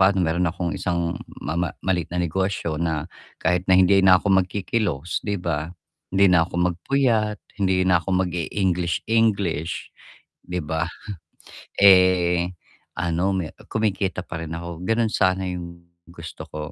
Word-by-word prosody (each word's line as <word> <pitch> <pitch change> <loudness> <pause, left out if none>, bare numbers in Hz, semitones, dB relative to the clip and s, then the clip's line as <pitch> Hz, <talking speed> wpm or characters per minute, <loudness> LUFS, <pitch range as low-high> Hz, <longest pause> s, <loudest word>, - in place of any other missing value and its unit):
pa'no 95 -1 +4
mayro'n 85 +2 +1
akong 85 0 -3
isang 85 -2 -2 0.2
ma - - -2
ma 85 +1 0 0.2
maliit 90 -3 0
na 90 - -5
negosyo 90 -2 -1
na 80 -3 -1 0.3
kahit 90 +1 0
na 95 - +6
hindi 95 +1 +5
na 95 -1 +7
ako 100 +1 0
magkikilos 90 -4 -2
'di 105 -1 -2
ba? 85 -4 -2 0.4
Hindi 95 -1 +4
na 85 -2 +5
ako 90 0 0
magpuyat, 110 +2 0 0.2
hindi 95 -1 +2
na 90 -2 +3
ako 95 +1 0
mag-e-English 90 0 -1
English, 100 -8 0 0.5
'di 90 0 -3
ba? 80 +1 -2 0.9
Eh, 90 -3 +5 0.5
ano 85 0 -1
me 90 -4 -3 0.2
kumikita 100 -4 -1
pa 80 - -6
rin 80 0 -5
ako, 85 0 -7
gano'n 115 -1 +1
sana 95 +1 +2
yung 90 -1 -5 0.3
gusto 85 -2 -9
ko. 75 - -6
90 Hz, 145 wpm, -23 LUFS, 85-95 Hz, 0.9 s, na